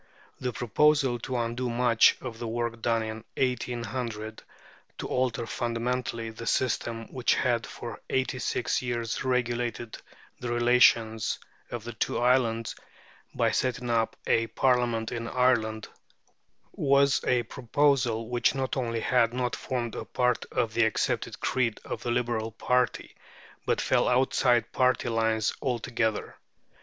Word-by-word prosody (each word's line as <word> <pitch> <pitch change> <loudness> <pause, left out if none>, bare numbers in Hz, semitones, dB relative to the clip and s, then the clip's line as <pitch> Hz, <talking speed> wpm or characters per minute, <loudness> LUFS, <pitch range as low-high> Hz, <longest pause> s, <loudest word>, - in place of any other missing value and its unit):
The 125 -1 -2
proposal 130 +2 +2
to 125 +2 -3
undo 120 +1 -2
much 120 -1 +4
of 115 -3 -7
the 120 - -4
work 115 0 -3
done 115 -1 +1
in 110 0 -6
1800, 120 -3 -2 0.6
to - - -4
alter 125 -2 0
fundamentally 115 0 -2
the 115 +1 -8
system 115 -2 0
which 125 -2 +2
had 120 -2 0
for 120 - -8
eighty 130 0 0
six 125 - -1
years 120 -2 -2
regulated 120 -2 -1 0.4
the 120 -1 -4
relations 120 -2 +3 0.3
of 120 -3 -5
the 120 +1 -6
two - - -1
islands, 120 -2 +2 0.6
by - - +2
setting 125 -1 -1
up 115 -1 +1
a 115 0 +2
Parliament 120 -2 +1
in 115 -1 -4
Ireland, 115 -4 +1 0.8
was 140 -1 +3
a 125 -1 +2
proposal 125 -2 +1
which 120 +2 +1
not 130 -1 -1
only 115 -4 -1
had 120 0 +2
not 125 -1 -1
formed 120 -4 -3
a - - -4
part 125 -1 0
of 115 -2 0
the 115 - +3
accepted 110 -1 -1
creed 120 -4 0
of - - -5
the 120 - -3
Liberal 120 -2 -1
party, 125 +2 0 0.5
but - - +2
fell - - +2
outside 125 -1 +2
party 125 -1 +2
lines 110 -1 +1
altogether. 120 -3 -1
120 Hz, 135 wpm, -28 LUFS, 115-125 Hz, 0.8 s, much